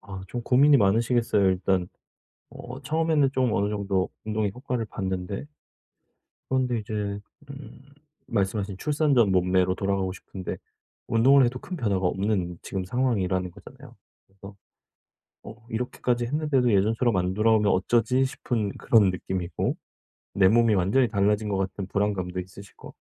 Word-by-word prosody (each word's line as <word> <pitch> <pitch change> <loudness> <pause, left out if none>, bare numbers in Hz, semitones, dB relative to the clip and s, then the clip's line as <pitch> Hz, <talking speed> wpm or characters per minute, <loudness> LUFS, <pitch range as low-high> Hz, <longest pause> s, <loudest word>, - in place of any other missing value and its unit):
아 95 -1 -9
좀 120 -1 -5
고민이 140 +4 +5
많으시겠어요 115 -1 +2
일단. 95 -1 0 0.6
어 125 +2 -9
처음에는 155 -1 +1
좀 130 -3 +1
어느 100 0 +1
정도 100 -3 -1 0.2
운동의 105 -2 -1
효과를 125 -3 -3
봤는데 95 +2 -4 1.0
그런데 125 -3 0
이제 105 -1 -4 0.3
음 135 -1 -11 0.5
말씀하신 100 -1 -1
출산 150 +4 +1
전 115 -7 +4
몸매로 90 0 +2
돌아가고 95 -1 -1
싶은데 95 -1 -7 0.5
운동을 130 +4 +5
해도 125 +1 -2
큰 180 +6 -7
변화가 100 - 0
없는 95 -2 -1
지금 95 -1 -4
상황이라는 95 -6 -1
거잖아요? - - -15 0.3
그래서 100 +1 -13 0.9
'어 110 - -10
이렇게까지 120 +1 -2
했는데도 135 -2 +1
예전처럼 110 +4 +2
안 90 +1 0
돌아오면 105 0 +3
어쩌지?' 120 +6 +2
싶은 120 -5 -2
그런 105 -5 +4
느낌이고 90 0 -3 0.6
내 95 -1 +4
몸이 115 -1 +4
완전히 100 +8 +2
달라진 105 0 +1
것 100 - -1
같은 95 0 -3
불안감도 95 -3 -1
있으시고 95 +2 -13
105 Hz, 340 characters per minute, -25 LUFS, 95-125 Hz, 1.0 s, 고민이